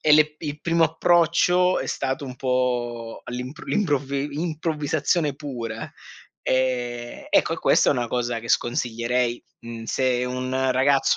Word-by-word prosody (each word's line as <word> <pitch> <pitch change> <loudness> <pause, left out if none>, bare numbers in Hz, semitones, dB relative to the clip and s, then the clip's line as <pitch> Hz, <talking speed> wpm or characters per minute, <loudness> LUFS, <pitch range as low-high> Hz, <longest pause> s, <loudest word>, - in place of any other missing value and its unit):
e 155 - +4
le 150 0 +5
il 150 -1 -5
primo 165 -1 +3
approccio 175 +2 +3
è - - -4
stato 135 +2 -2
un 130 -2 -7
po' 120 -3 -1
all'improv 125 +5 -6
l'improvvi 145 -7 0
improvvisazione 155 -1 0
pura 120 -6 -6 0.5
ehm 120 -2 -1
ecco - - +3
e - - -8
questa - - +4
è - - +5
una 120 -1 -1
cosa 120 -1 -1
che 115 - -10
sconsiglierei, 120 0 0 0.2
mhmm, 115 -1 -8
se 125 +1 +1
un 130 +1 -1
ragazzo 135 +1 +3
130 Hz, 140 wpm, -24 LUFS, 120-150 Hz, 0.5 s, le